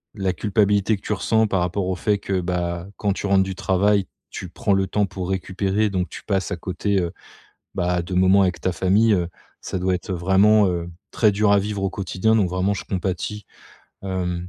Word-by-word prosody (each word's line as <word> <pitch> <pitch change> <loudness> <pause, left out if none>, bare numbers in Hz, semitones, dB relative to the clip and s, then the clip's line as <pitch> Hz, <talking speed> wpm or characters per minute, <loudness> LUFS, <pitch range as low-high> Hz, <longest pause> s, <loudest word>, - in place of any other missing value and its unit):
la 95 -2 0
culpabilité 105 +2 +2
que - - -21
tu 105 - -2
ressens 110 +3 +2
par 95 -3 0
rapport 90 +2 -1
au 95 - -1
fait 105 +2 0
que, 95 -2 -1
bah, 85 0 -2
quand 100 -2 0
tu 100 - -5
rentres 95 -1 +4
du 95 -1 -5
travail, 100 +1 +2 0.2
tu 90 - -7
prends 100 +3 0
le 95 0 +2
temps 105 +1 +1
pour 95 -1 -5
récupérer, 95 +2 0
donc 90 -2 -1
tu - - -9
passes 95 -1 -1
à - - 0
côté, 95 +3 -1
heu, 85 -2 -2 0.6
bah, 90 -1 0
de 85 +2 -7
moments 95 +2 +5
avec 90 -1 0
ta 95 - 0
famille, 105 +5 +3
heu, 90 -3 +1 0.3
ça 95 - -4
doit 90 0 +1
être 90 +2 -6
vraiment, 95 +4 +4
heu, 85 -1 -2 0.2
très 105 -3 +3
dur 100 +1 +2
à 100 - +5
vivre 100 -1 -3
au 95 - +1
quotidien. 95 +3 0
Donc, 95 -5 +2
vraiment, 90 +3 0
je - - -5
compatis. 95 +2 -3 0.6
Hem, 90 -2 -3
95 Hz, 210 wpm, -22 LUFS, 90-100 Hz, 0.6 s, moments